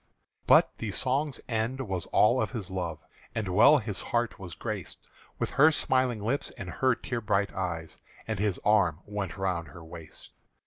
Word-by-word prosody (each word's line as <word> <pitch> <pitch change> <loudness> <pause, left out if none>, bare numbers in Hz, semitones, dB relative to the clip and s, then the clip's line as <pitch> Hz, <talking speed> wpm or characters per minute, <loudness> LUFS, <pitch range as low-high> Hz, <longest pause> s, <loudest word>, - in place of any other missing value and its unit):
But - - +5
the 110 - -3
song's 135 +6 0
end 115 +3 -1
was 95 -8 -3
all 120 +4 +4
of - - -1
his 105 -7 -5
love; 90 -3 -3 0.4
And 110 -3 -2
well 115 +11 +7
his 110 -6 -4
heart 120 0 -1
was 90 -3 -8
grac'd - - -5 0.4
With - - -2
her 150 +4 +6
smiling 130 -7 +1
lips 130 +6 -1
and - - -6
her 130 -2 +2
tear 120 0 -4
bright 100 -2 0
eyes 85 -4 -4 0.3
As 110 -3 -2
his 100 -3 0
arm 95 -7 +3
went 100 -3 -4
round 90 -4 -1
her 80 +4 -12
waist. 80 -1 -12
105 Hz, 175 wpm, -28 LUFS, 90-120 Hz, 0.4 s, well